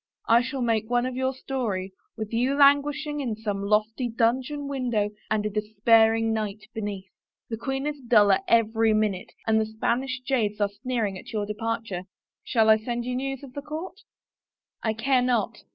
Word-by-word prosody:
I 230 +1 +6
shall 255 +1 -3
make 225 -2 0
one 245 0 +2
of 255 -1 -3
your 260 0 0
story, 235 -8 -3 0.3
with 220 0 -5
you 250 +4 +1
languish 285 +1 +4
ing 295 0 -3
in 245 -6 -2
some 210 -2 -3
lofty 215 +4 +1
dungeon 255 +5 0
window 240 -7 -1 0.2
and 215 -1 0
a - - +1
despairing 220 +2 +3
knight 210 -1 -3
beneath. 205 -3 -4 0.5
The 225 - -2
queen 270 +3 -3
is 295 -1 -3
duller 205 -5 +5
every 225 -1 +3
minute 210 -4 -1
and 220 0 +3
the - - 0
Spanish 245 +4 -1
jades 225 -6 0
are 205 -1 +2
sneering 210 -2 -3
at - - -11
your 210 -2 -1
departure.... 215 -3 -3 0.4
Shall 225 -2 +2
I 220 - +7
send 235 +1 -3
you 250 0 -2
news 270 +1 -3
of 265 -2 -11
the 285 - -5
court?" 315 +7 -7 0.8
"I 220 - 0
care 250 +4 +2
not." 245 -1 0
230 Hz, 180 wpm, -26 LUFS, 215-260 Hz, 0.8 s, I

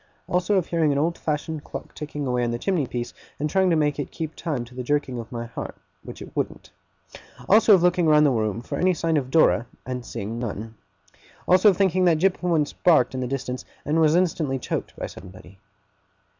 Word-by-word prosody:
Also 180 +3 +1
of 185 -4 +2
hearing 165 -4 +1
an 140 - 0
old 165 +4 +1
fashioned 155 0 -3
clock - - -8
ticking 150 -1 -5
away 125 -1 0
on 120 - 0
the 120 - -2
chimney 160 0 0
piece, 120 -1 -4 0.3
and 150 - 0
trying 190 +3 +2
to 170 - +3
make 150 -2 +1
it 145 - -3
keep 160 -1 -6
time 140 -8 -3
to 120 - -16
the 125 - -5
jerking 130 -1 -1
of 115 - -8
my 120 -1 -4
heart, 115 - -7 0.3
which - - -9
it - - -14
wouldn't. - - -4 0.8
Also 215 0 +7
of 175 - +1
looking 180 -1 +3
round 150 -1 +6
the 145 - +4
room 110 -2 -1
for - - -4
any 185 0 +3
sign 165 0 0
of 135 -4 0
Dora, 130 -5 +3 0.2
and 125 0 -4
seeing 110 +1 -5
none. 110 -1 -5 0.7
Also 185 +3 +6
of 190 - +1
thinking 185 -2 +2
that 170 -3 +4
Jip 185 +3 +1
once 165 -5 +1
barked 155 -9 +3
in 130 - -3
the 125 - -2
distance, 130 -1 -4 0.2
and 155 +3 +2
was 155 0 +4
instantly 160 -6 +1
choked 125 - -4
by - - -5
somebody. 95 +1 -12
150 Hz, 215 wpm, -24 LUFS, 125-170 Hz, 0.8 s, Also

